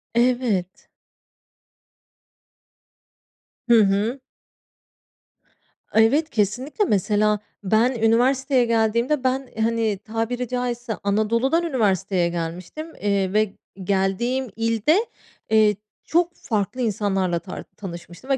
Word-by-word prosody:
Evet. 235 -7 0 2.8
Hı 235 -1 +7
hı. 205 +6 0 1.7
Evet 275 +9 +3
kesinlikle. 245 - 0
Mesela, 210 - +2 0.2
ben 220 +5 +3
üniversiteye 250 +3 +2
geldiğimde 235 +5 +1
ben, 260 0 0
hani, 225 -2 +1
tabiri 225 +4 -3
caizse 245 -1 -3
Anadolu'dan 230 +10 +1
üniversiteye 195 - +1
gelmiştim, 175 - -5
eee, 200 -2 0
ve 215 -1 +2 0.3
geldiğim 200 +7 0
ilde, 230 - +2 0.4
eee, 215 -1 +4 0.3
çok 345 +1 +1
farklı 225 +1 -2
insanlarla 195 -5 0
tar 170 - -8
tanışmıştım 175 +4 -9
ve 270 - +3
225 Hz, 90 wpm, -23 LUFS, 200-255 Hz, 2.8 s, Hı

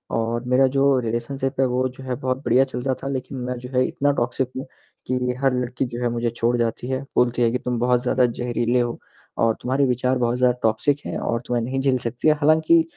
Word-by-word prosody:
और 115 +1 -1
मेरा 130 +1 +4
जो 135 -1 +4
रिलेशनशिप 130 +4 -3
है 135 - +4
वो 130 +1 0
जो 130 +1 -12
है 130 -1 -3
बहुत 130 0 -2
बढ़िया 125 +3 +5
चल 125 -2 -5
रहा 130 0 0
था - - -3
लेकिन 130 0 -4
मैं 125 0 -3
जो 125 0 -9
है 130 - +4
इतना 145 +1 +1
टॉक्सिक 125 +2 -1
हूँ, 130 - -4 0.4
कि 125 0 0
हर 135 -2 +3
लड़की 125 +1 -1
जो 120 0 -6
है 120 - +1
मुझे 120 0 -1
छोड़ 120 +1 0
जाती 120 +1 -2
है। 130 0 -2
बोलती 125 0 +2
है 115 - +4
कि 125 - 0
तुम 125 -1 -2
बहुत 125 0 +2
ज़्यादा 130 -1 +3
ज़हरीले 120 0 0
हो 120 -1 -2 0.4
और 115 -1 +3
तुम्हारे 135 +3 +1
विचार 125 +1 +1
बहुत 120 0 0
ज़्यादा 125 -1 +2
टॉक्सिक 115 +7 +1
हैं - - -3
और 115 0 -1
तुम्हें 120 -1 -1
नहीं 135 +3 -2
झेल 135 -1 +2
सकती 120 +6 -2
है 155 - +7
हालाँकि 160 +2 +5
125 Hz, 235 wpm, -23 LUFS, 120-130 Hz, 0.4 s, है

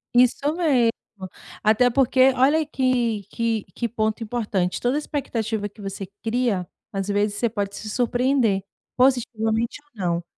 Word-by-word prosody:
Isso 250 +4 +4
mesmo. 265 -10 +3 0.7
Até 220 +4 +4
porque, 260 +1 +4
olha 275 +5 +4
aí 310 - 0
que 245 -7 0
que 230 -2 -1
que 235 -2 -2
ponto 220 0 -1
importante, 210 -6 -1
toda 250 +4 +1
expectativa 225 -8 -2
que 205 +1 -15
você 195 -1 -5 0.2
cria, 225 -6 0 0.3
às 195 0 -2
vezes, 205 0 0
você 235 +1 0
pode 200 -2 -3
se 215 - -7
surpreender 245 -3 +1 0.3
positivamente, 235 -2 +1
ou 295 - -33 0.2
não. 170 0 0
230 Hz, 145 wpm, -23 LUFS, 210-255 Hz, 0.7 s, Isso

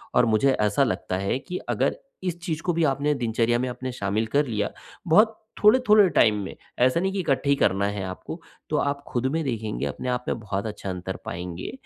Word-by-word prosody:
और 125 - +5
मुझे 115 +4 +3
ऐसा 105 +1 +2
लगता 110 -6 -1
है 100 +6 -1
कि 180 +5 -6
अगर - - +1 0.3
इस 175 -2 -2
चीज़ 165 -3 -3
को 175 - +1
भी 170 - +1
आपने 145 +2 0
दिनचर्या 120 -1 +1
में 125 +1 -1
अपने 130 +1 -5
शामिल 110 -1 -1
कर 145 - +4
लिया, 105 -3 -1 0.4
बहुत 215 +7 +4 0.2
थोड़े-थोड़े 210 -2 +6
टाइम 115 -8 +4
में, 95 - -7 0.2
ऐसा 130 +6 +4
नहीं 190 +1 0
की 200 - -2
इकट्ठे 140 -4 0
ही 140 - +5
करना 100 -7 +2
है 100 -1 -3
आपको। 95 - -7 0.3
तो 150 - +1
आप 140 -1 -1
खुद 120 +1 -2
में 165 - 0
देखेंगे 110 -6 -2
अपने 125 - -4
आप 125 0 -2
में - - -1
बहुत 100 -2 -3
अच्छा 105 -2 -6
अंतर 95 0 -4
पाएँगे 90 0 -5
125 Hz, 215 wpm, -25 LUFS, 105-160 Hz, 0.4 s, थोड़े-थोड़े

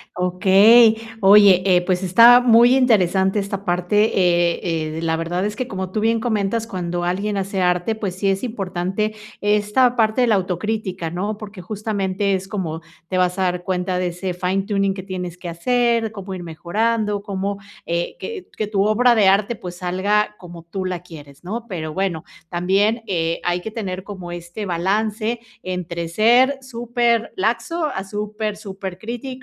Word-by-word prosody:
Okey. 195 +6 +5 0.3
Oye, 195 -2 +7
eh, 180 -2 +4
pues 185 0 0
está 235 +7 +7
muy 240 +1 +6
interesante 195 -6 +3
esta 200 0 -4
parte, 180 +4 +2
eh 170 -3 +1
eh, - - -4
la 165 -1 0
verdad 170 +3 -2
es 210 0 -3
que 255 - -3
como 190 -1 -4
tú 215 - -1
bien 225 +1 +2
comentas, 220 -1 -1
cuando 175 -4 -3
alguien 200 +3 -1
hace 195 0 -2
arte, 180 +4 +1
pues 200 -4 -4
sí 195 +1 -2
es 195 +3 -1
importante 200 -1 -2 0.2
esta 210 +4 +2
parte 225 +1 +2
de 245 - +3
la 215 - +4
autocrítica, 190 -1 -2
¿no? 200 +5 -3
Porque 210 -3 -9
justamente 200 0 -2
es 190 0 -3
como, 165 -6 -4 0.3
te 185 - -2
vas 180 +1 +1
a - - +2
dar 180 -1 -1
cuenta 180 0 -1
de 180 0 0
ese 180 +1 -4
fine 185 +2 -1
tuning 200 -1 0
que 190 -1 -7
tienes 180 -2 -6
que 180 - -9
hacer, 230 +5 +1
cómo 195 -2 -7
ir 180 -1 -6
mejorando, 205 +5 -1
cómo, 200 -1 -3 0.3
eh, 170 +1 -2
que 425 -5 -7
que 215 - -2
tu 200 -2 +1
obra 235 +4 +4
de 205 -4 +4
arte, 200 +4 +2
pues 180 -2 -8
salga 200 +4 0
como 170 -2 -11
tú 190 +3 -5
la 185 -1 -3
quieres, 150 -4 -13
¿no? 225 +5 -4
Pero 155 -5 -5
bueno, 185 -4 -2 0.2
también, 195 +6 +1
eh, 165 -2 -1
hay 175 0 0
que 220 - -6
tener 190 -4 -5
como 185 -4 -8
este 175 +4 -7
balance 215 +6 -1 0.2
entre 170 -2 -4
ser 240 +9 +4
superlaxo 235 - -1
a 195 -10 -3
super, 210 +1 -4
supercrítico 200 +5 -7
195 Hz, 170 wpm, -21 LUFS, 180-215 Hz, 0.3 s, Oye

